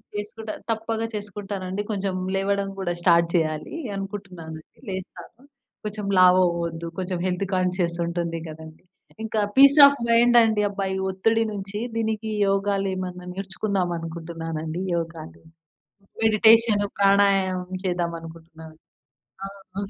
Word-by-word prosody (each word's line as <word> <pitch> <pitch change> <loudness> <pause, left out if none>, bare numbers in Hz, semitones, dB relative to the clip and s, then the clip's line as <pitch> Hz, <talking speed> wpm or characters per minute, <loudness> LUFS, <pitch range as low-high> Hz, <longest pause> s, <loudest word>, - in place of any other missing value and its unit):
చేసుకుంటా. 215 +1 -5 0.2
తప్పక 225 0 -2
చేసుకుంటానండి. 200 -2 -5
కొంచెం 195 -2 -2 0.2
లేవడం 200 0 0
కూడా 175 -2 -1
స్టార్ట్ 170 -1 +4
చేయాలి. 155 - -1 0.2
అనుకుంటున్నానండి 185 -5 -8
లేస్తాను. 190 +5 -8 0.4
కొంచెం 210 -1 -4
లావు 185 0 +6
అవ్వద్దు. 170 -1 -4
కొంచెం 185 -1 -3
హెల్త్ 185 +1 -1
కాన్షియస్ 180 -2 0
ఉంటుంది 170 -1 -3
కదండీ! 160 0 -11 0.4
ఇంకా 220 0 -2 0.2
పీస్ 280 +2 +7
ఆఫ్ 280 0 +4
మైండ్ 240 +1 +5
అండి. 220 -2 +1
అబ్బా! 200 -1 -3
ఈ - - -2
ఒత్తిడి 225 +4 +1
నుంచి 200 +1 -5 0.2
దీనికి 220 -1 -2 0.2
యోగాలు 195 0 0
ఏమన్నా 180 -1 -6
నేర్చుకుందాం 195 -1 -2
అనుకుంటున్నానండి. 165 0 -5
యోగాలు, 165 - -6 0.8
మెడిటేషను, 220 -1 +5
ప్రాణాయామం 195 -2 +2
చేద్దామనుకుంటున్నాను. 165 -2 -5 0.7
ఆ! - - -4 0.3
హ్మ్. 200 0 -3
190 Hz, 115 wpm, -24 LUFS, 170-205 Hz, 0.8 s, పీస్